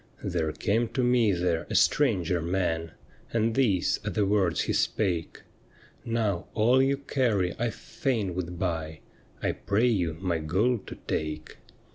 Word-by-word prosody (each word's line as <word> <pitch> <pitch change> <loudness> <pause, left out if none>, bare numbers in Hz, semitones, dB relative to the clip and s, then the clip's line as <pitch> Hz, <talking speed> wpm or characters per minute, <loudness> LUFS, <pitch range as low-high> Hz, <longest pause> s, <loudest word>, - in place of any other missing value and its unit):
' - - -25
There 80 -3 -1
came 115 +7 0
to 130 - +2
me 120 -3 +4
there 85 -2 0
a - - -3
stranger 90 - +3
man, 85 -2 -1 0.4
And 115 0 +1
these 110 -9 +2
are - - -2
the 105 - +1
words 95 -4 +2
he - - -1
spake: 90 -6 -1 0.4
" - - -26 0.2
Now, 110 -6 -1
all 120 +5 +4
you 135 +1 +2
carry 120 -10 0
I 120 +1 +1
fain 110 -5 -2
would 90 -1 -4
buy, 80 -3 -3 0.4
I - - +2
pray 105 +4 0
you 90 -9 +1
my 90 -3 -1
gold 100 +8 0
to - - -7
take." 75 0 -3
95 Hz, 160 wpm, -27 LUFS, 85-115 Hz, 0.4 s, me